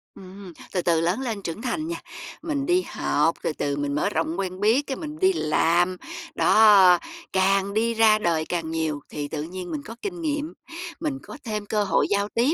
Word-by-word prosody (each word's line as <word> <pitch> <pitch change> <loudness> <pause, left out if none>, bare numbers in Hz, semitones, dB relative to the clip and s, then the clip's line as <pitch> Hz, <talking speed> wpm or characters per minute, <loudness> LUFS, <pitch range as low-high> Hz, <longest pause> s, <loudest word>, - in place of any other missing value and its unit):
Ừm, 190 -1 -11 0.2
từ 180 - +1
từ 165 -2 +2
lớn 175 +7 +1
lên 230 -6 -3
trưởng 175 +3 -5
thành 260 +6 -2
nha, 335 - -4 0.4
mình 290 -4 -2
đi 355 +3 +3
học, - - +1
từ - - 0
từ 140 -1 -2
mình 145 0 -2
mở 150 - +1
rộng 165 +3 -2
quen 185 -1 -3
biết, 230 +8 +3
cái 270 - -3
mình 305 -1 -7
đi 380 0 +4
làm, 175 - +2 0.4
đó, 200 -5 +7 0.4
càng 195 +1 +2
đi 230 +2 +1
ra 220 -1 +5
đời 165 -5 0
càng 165 -2 -3
nhiều 160 -2 -1
thì 145 -1 -4
tự 150 0 -4
nhiên 175 +2 -7
mình 150 -3 -3
có 225 - -8
kinh 360 -4 -5
nghiệm, 300 0 -2 0.5
mình 295 -5 -2
có - - -10
thêm 215 -3 -3
cơ 210 0 0
hội 195 - +2
giao 200 0 +1
tiếp, 250 +7 +3
200 Hz, 205 wpm, -24 LUFS, 170-255 Hz, 0.5 s, đó